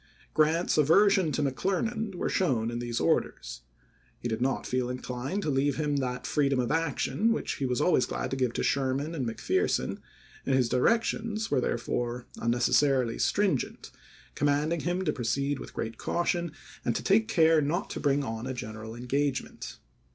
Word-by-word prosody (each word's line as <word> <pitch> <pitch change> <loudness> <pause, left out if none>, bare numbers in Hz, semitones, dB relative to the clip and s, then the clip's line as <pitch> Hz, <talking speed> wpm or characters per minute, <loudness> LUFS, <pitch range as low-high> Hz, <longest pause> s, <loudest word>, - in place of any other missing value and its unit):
Grant's 155 +2 +2
aversion 185 +3 +4
to 145 - 0
Mc 135 -2 -1
Clernand 210 - -1
were - - -2
shown 120 -11 +1
in 120 - -3
these 120 -1 -2
orders. - - -1 0.6
He - - -3
did 115 0 -2
not 135 +1 0
feel 125 -1 -1
inclined 125 +9 -4
to 150 - 0
leave 135 +1 +1
to 155 - -1
him 145 -1 0
that 125 -2 -2
freedom 140 -3 +1
of 125 - 0
action 165 - +1
which 230 - -2
he 135 -4 -1
was 125 +1 0
always 150 -4 +3
glad - - -3
to - - 0
give 130 -3 +1
to - - -2
Sherman 140 +3 0
and 135 -7 -2
McPherson, 115 - 0 0.4
and 135 - +1
his 125 -3 +2
directions 220 - +1
were 135 -3 +3
therefore 120 0 -2
un 115 - -1
necessarily 125 0 +2
stringent, 195 -11 0 0.4
commanding 145 +3 +1
him 175 +3 -1
to 150 - +1
proceed 140 +4 -1
with - - -10
great 115 0 -4
caution 175 -1 -1 0.3
and 120 - 0
to - - -2
take 220 +3 +3
care 160 -6 +4
not 170 +8 -1
to - - -4
bring 145 -1 +2
on 115 -1 -4
a 130 - -3
general 110 -1 -7
engagement. 130 +3 -2
140 Hz, 180 wpm, -28 LUFS, 125-165 Hz, 0.6 s, aversion